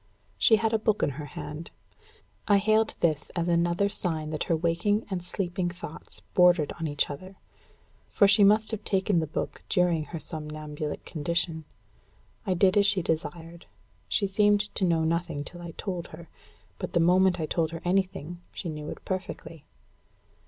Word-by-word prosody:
She 225 - +6
had 225 +1 0
a 220 - +3
book 215 -1 +1
in - - +2
her 145 +2 -7
hand. 155 +3 -6 0.8
I 205 -1 +6
hailed 215 +2 +2
this 155 -4 +1
as 170 -1 0
another 175 +3 +2
sign 165 -6 -2
that 155 - -2
her 165 - +2
waking 170 +6 +1
and 180 -2 -2
sleeping 180 0 -2
thoughts 175 -3 -7
bordered 175 -4 +4
on 165 - -1
each 145 0 0
other; 185 +7 -9 0.7
for 200 - +5
she 200 +1 +6
must 215 +3 +5
have 220 -2 -4
taken 195 -2 +2
the 160 - -1
book 150 - -4
during 175 -4 +2
her 165 - -6
somnambulic 150 -1 -5
condition. 165 0 -2 0.8
I 185 - +2
did 190 +2 +4
as 200 0 +5
she 200 -3 +2
desired. 165 +1 -4 0.4
She 205 - +1
seemed 205 +1 +2
to 190 - +1
know 165 -2 +2
nothing 165 -2 -1
till 175 +3 -10
I 170 - -7
told 180 -4 -4
her. 165 +1 -12 0.5
But - - -5
the - - +3
moment 180 +2 +4
I 160 - 0
told 160 +1 0
her 165 +1 -7
anything, 175 -2 -1
she 175 - -5
knew 150 -1 -6
it - - -8
perfectly. 170 -4 -5
175 Hz, 175 wpm, -27 LUFS, 160-195 Hz, 0.8 s, She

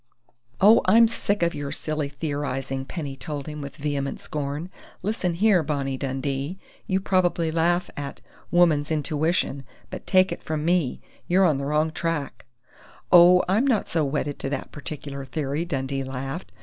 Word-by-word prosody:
"Oh, 215 +4 +7
I'm 225 +5 +6
sick 205 -4 -1
of 170 - +2
your 145 -1 -4
silly 155 -1 -2
theorizing!" 135 -3 -3
Penny 145 -3 -5
told 145 0 -6
him 150 -1 -6
with 140 -1 -7
vehement 140 -2 -2
scorn. 150 +4 -4 0.3
"Listen 190 -4 -1
here, 200 -1 +4
Bonnie 140 -3 -2
Dundee! 135 +4 -3 0.3
You 190 -2 +1
probably 175 -4 +1
laugh 175 +2 +1
at 140 -1 -6 0.3
'woman's 160 -4 +3
intuition', 155 -2 0 0.3
but - - -7
take 185 0 +4
it - - -5
from 155 -1 -3
me 170 -6 +1 0.3
you're 185 +2 +4
on 150 -6 +2
the 140 - -3
wrong 150 +2 +1
track!" 165 -3 -3 0.7
"Oh, 180 +1 +8
I'm 215 +9 +2
not 235 -6 +1
so 165 -2 +1
wedded 145 0 -2
to - - -2
that 140 - -4
particular 140 -2 -7
theory!" 145 +3 -2
Dundee 135 -4 -2
laughed. 135 +6 -5
150 Hz, 160 wpm, -25 LUFS, 140-175 Hz, 0.7 s, Oh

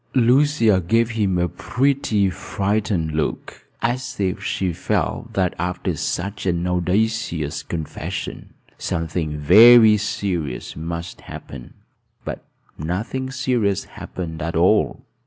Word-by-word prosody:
Lucia 125 -4 +4
gave 115 +7 +2
him 100 -5 0
a 90 0 +1
pretty, 125 -4 +1
frightened 95 -3 -1
look, 75 -1 -4 0.2
as 125 0 -2
if 95 -1 -1
she 95 -1 -1
felt - - -2
that, 95 -2 +1
after 90 +1 -2
such 100 +2 -3
an 85 -1 0
audacious 90 -3 0
confession, 80 +2 -5 0.3
something 80 -2 -2
very 110 +8 +8
serious 90 -10 -3
must 85 +2 -6
happen; 65 -3 -10 0.5
but - - -5 0.4
nothing 105 - -3
serious 125 -7 0
happened 80 -3 -7
at 85 +2 -3
all. 95 +6 +2
95 Hz, 110 wpm, -21 LUFS, 85-110 Hz, 0.5 s, very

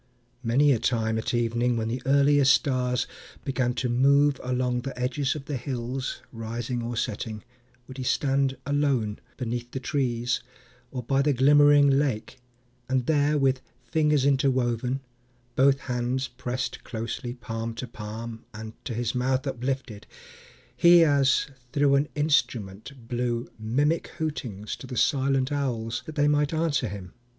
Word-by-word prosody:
many 135 +5 +4
a 125 - +2
time, 110 -2 0
At 110 - -2
evening, 120 0 +1
when 110 -1 -1
the 120 +2 -3
earliest 140 -1 +5
stars 125 -2 0 0.4
began 130 -2 0
To 125 - -1
move 140 +3 +3
along 125 -1 0
the 135 0 -6
edges 135 +3 0
of 145 -3 -7
the 145 -2 -3
hills, 125 +1 -4
Rising 115 +1 -4
or 120 0 -4
setting, 110 -1 -3 0.4
would 130 0 -9
he - - -3
stand 135 0 +1
alone, 140 -7 0 0.2
Beneath 120 -1 -3
the 130 - -4
trees, 125 -3 -1 0.5
or 125 -1 -5
by 135 +3 +2
the 145 +1 +2
glimmering 145 +2 +6
lake; 135 -4 0 0.5
And 130 -2 +1
there, 150 0 +2
with 135 -2 +2 0.3
fingers 150 -3 +3
interwoven, 130 -2 +1 0.5
both 135 +1 +4
hands 125 +1 -1
Pressed 125 0 -4
closely 115 +2 -5
palm 115 -2 -5
to 125 +2 -5
palm 110 +1 -7
and 110 0 -7
to 120 - -3
his 120 -1 -1
mouth 130 +2 0
Uplifted, 130 -4 -3 0.7
he, 170 0 +7
as 140 -4 +3 0.3
through 140 -1 +3
an 140 +2 +2
instrument, 125 -5 -1
Blew 120 -1 -2
mimic 145 +9 +1
hootings 125 - -4
to 130 - -10
the 125 -1 -6
silent 135 -1 +2
owls, 125 -5 -2
That 155 - -7
they 145 -1 +3
might 150 +1 +2
answer 155 -6 +1
him. 95 -3 -8
130 Hz, 145 wpm, -26 LUFS, 120-140 Hz, 0.7 s, he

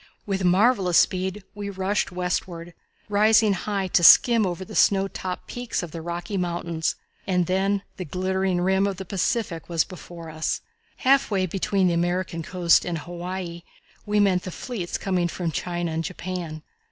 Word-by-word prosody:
With 195 -2 -2
marvellous 185 0 +3
speed 190 +2 +1
we 205 -1 -5
rushed 195 +1 -1
westward, 175 -1 -3 0.3
rising 215 +1 +4
high 195 +1 -2
to 175 - +3
skim 230 +3 +7
over 180 +1 -4
the - - -11
snow 195 -1 +4
topped 185 -1 -5
peaks 245 -6 -3
of 170 - -7
the 165 - -6
Rocky 175 +4 -4
Mountains 170 -2 -2 0.3
and 180 -2 +2
then 195 +2 0
the 185 - -5
glittering 185 +2 -1
rim 190 +2 +2
of 195 -2 -3
the 190 - -6
Pacific 185 -2 -2
was 165 -2 +2
before 170 -3 -10
us. 155 0 -2 0.4
Half 275 +1 +3
way 195 -3 +1
between 190 +1 0
the 175 - +2
American 175 0 -1
coast 175 0 +3
and 175 -2 -3
Hawaii 175 +1 -6 0.4
we 210 0 +1
met 190 -3 +3
the 185 - -6
fleets 185 -2 -4
coming 180 -3 0
from 170 -1 -3
China 175 +2 -3
and 160 +1 -2
Japan. 170 -2 -5
185 Hz, 165 wpm, -24 LUFS, 175-195 Hz, 0.4 s, skim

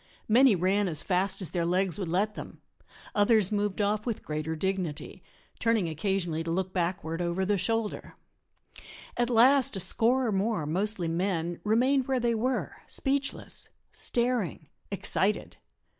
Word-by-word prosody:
Many 240 0 +5
ran 190 +3 +1
as 155 -4 -2
fast 190 +1 0
as 175 - 0
their 175 -2 -1
legs 180 +2 0
would 190 - -3
let 195 +6 0
them; - - -9 0.5
others 205 -1 +3
moved 205 -1 -1
off 210 +1 0
with 230 -2 -4
greater 155 +1 -3
dignity, 185 -3 -3 0.4
turning 230 -6 +1
occasionally 165 0 -1
to 165 - -5
look 185 +2 -2
backward 170 -2 -2
over 175 +2 -1
the 200 0 +1
shoulder. 225 +2 -2 1.0
At 240 0 0
last 250 0 +5
a - - -3
score 245 +7 +3
or 225 - 0
more, 195 -4 0
mostly 185 +3 -1
men, 170 0 -1
remained 250 +5 +2
where 265 -1 +1
they 235 -1 +1
were, 245 +3 -2
speechless, 275 0 -1 0.2
staring, 235 - -1 0.2
excited. 200 +1 0
200 Hz, 145 wpm, -28 LUFS, 175-230 Hz, 1.0 s, Many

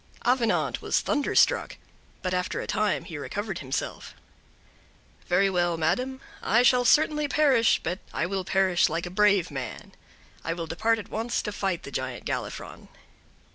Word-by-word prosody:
Avenant 240 -3 +1
was - - +1
thunderstruck; 290 -2 +2 0.5
but 185 -1 -1
after 180 0 -1
a - - -4
time 215 -2 0
he 160 -6 -7
recovered 200 +5 -4
himself. 135 -1 -4 1.1
"Very 180 +3 +3
well, 175 -3 +1
madam, 255 +12 -1 0.2
I 230 +4 +3
shall 250 0 +4
certainly 300 +2 +3
perish, 275 -6 +3
but 175 +4 -2
I - - -1
will 190 +1 -2
perish 190 -1 +2
like 165 +2 -2
a 175 - -6
brave 200 -3 +3
man. 130 -5 -6 0.5
I 165 - -1
will 165 -1 -4
depart 220 +8 +1
at 215 - -8
once 225 +2 -2
to 210 - -3
fight 195 -4 -2
the 140 - -8
Giant 130 -2 -4
Galifron." - - -5
195 Hz, 155 wpm, -26 LUFS, 175-230 Hz, 1.1 s, shall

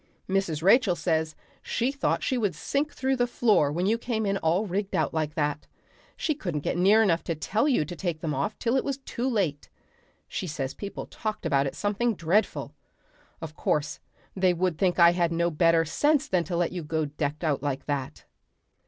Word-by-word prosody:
Mrs. 190 -5 -1
Rachel 200 -1 +5
says 160 -1 -1 0.3
she 240 +3 -1
thought 280 -1 -1
she 260 - 0
would 210 -7 0
sink 290 +2 -1
through 265 +1 0
the 245 -1 +1
floor 215 -12 +3
when 175 +4 -1
she - - +2
saw - - +3
you 230 - +2
come 225 -3 -2
in 195 0 +1
all 175 +5 +1
rigged 200 +1 -2
out - - 0
like 155 -1 -2
that. 150 -1 -1 0.5
She 310 - 0
couldn't 175 - -4
get - - -2
near 200 +5 +5
enough 170 -5 +2
to 165 - -1
tell 215 - 0
you 200 - +2
to 175 - -7
take 170 -2 -3
them 155 -2 -2
off 210 - -2
till 235 +2 0
it 265 - +2
was 275 -1 -2
too 260 -2 -3
late. 180 - -1 0.6
She 185 - -4
says 140 -4 -3
people 200 -1 -6
talked 215 -1 -5
about 140 0 +2
it - - -5
something 210 +3 0
dreadful. 180 +6 0 0.7
Of 160 -1 -7
course 150 -2 -1 0.4
they 185 -2 +2
would 180 -2 -1
think 185 -2 +2
I 170 -1 +7
had 175 -1 +1
no 170 +1 +1
better 165 +1 +3
sense 290 - +2
than 180 -3 +1
to 170 +2 -2
let 175 -1 +1
you 180 - -4
go 160 0 -1
decked 145 +2 -3
out 150 -4 0
like 140 -2 -3
that." 140 -3 -4
175 Hz, 210 wpm, -27 LUFS, 155-215 Hz, 0.7 s, I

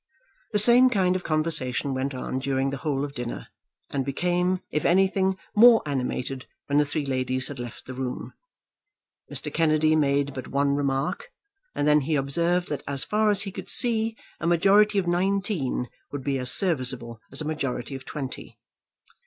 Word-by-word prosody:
The 210 - +1
same 240 +4 +6
kind 185 -6 +1
of 185 - -3
conversation 155 -4 0
went 130 +1 -2
on 130 0 -3
during 135 0 -1
the 140 - -4
whole 140 -1 -2
of 140 - -9
dinner, 120 -3 -6 0.4
and 140 -1 -1
became, 180 +6 0
if 150 - -1
anything, 190 +1 +2 0.2
more 230 +1 +7
animated 130 -1 -3 0.2
when 145 +1 +2
the 150 - +3
three 145 0 -2
ladies 130 -1 -1
had 140 -3 -8
left 120 -1 -8
the 130 - -7
room. 130 -1 -5 1.0
Mr. - - -3
Kennedy 155 -1 +3
made 140 -2 +1
but 130 - -7
one 140 0 +1
remark, 140 - -2 0.4
and 145 - 0
then 150 0 +5
he 150 +3 -1
observed 170 +6 0
that 145 - -3
as 140 -1 0
far 215 0 +1
as 205 -2 +2
he 195 - -6
could - - -8
see 225 -2 +2 0.2
a 170 - -2
majority 200 +5 +4
of 195 - +1
nineteen 180 - -1 0.2
would 145 -2 -5
be 135 -1 -1
as 125 -1 -2
serviceable 125 - +1
as 135 - 0
a - - -4
majority 140 -4 -3
of 135 -1 -7
twenty. 135 -3 -7
145 Hz, 175 wpm, -25 LUFS, 135-185 Hz, 1.0 s, more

